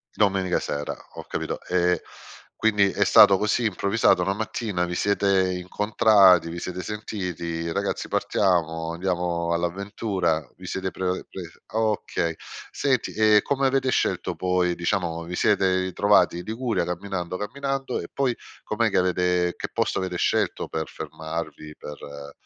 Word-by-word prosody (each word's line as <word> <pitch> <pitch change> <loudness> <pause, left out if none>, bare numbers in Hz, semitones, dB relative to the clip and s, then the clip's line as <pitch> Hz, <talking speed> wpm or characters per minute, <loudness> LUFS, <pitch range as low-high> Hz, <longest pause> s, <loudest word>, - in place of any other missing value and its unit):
Domenica 95 -3 +2
sera, 75 0 -4 0.2
ho - - -8
capito, - - -3
ehm, 90 0 +2 0.6
quindi 105 -3 +3
è - - +1
stato 95 - +7
così 105 +3 0
improvvisato 100 -1 +2
una 95 - 0
mattina, 105 -3 -2
vi 85 0 -4
siete 100 -2 +2
incontrati, 95 -1 +4
vi 85 - -6
siete 90 +1 -5
sentiti: 90 -6 -4
"Ragazzi 100 +2 -2
partiamo, 80 -4 0
andiamo 85 -1 -1
all'avventura." 85 - -1
Vi - - -12
siete 95 0 -3
pre 95 - -6
uhm, 90 - -2
pres 85 -3 -9
okay. 105 -6 -1 0.4
Senti, 130 -4 0
e 110 -1 +5
come 135 -1 +1
avete 130 -1 +1
scelto - - 0
poi 90 -1 +1
diciamo, 85 -2 -1
vi 90 +1 -5
siete 100 -1 +3 0.2
ritrovati 95 -1 +3
i 90 - -6
Liguria 115 -3 -1
camminando, 90 0 -4
camminando, 135 +4 -3
e - - -9
poi 130 -4 0 0.3
com'è 110 +1 0
che 95 - 0
avete 90 -1 +1
che - - -5
posto - - 0
avere 90 -1 -3
scelto - - 0
per 80 -1 -3
fermarvi, 80 -1 -7
per 75 0 -8
uhm, 70 0 -9
95 Hz, 145 wpm, -24 LUFS, 85-105 Hz, 0.6 s, stato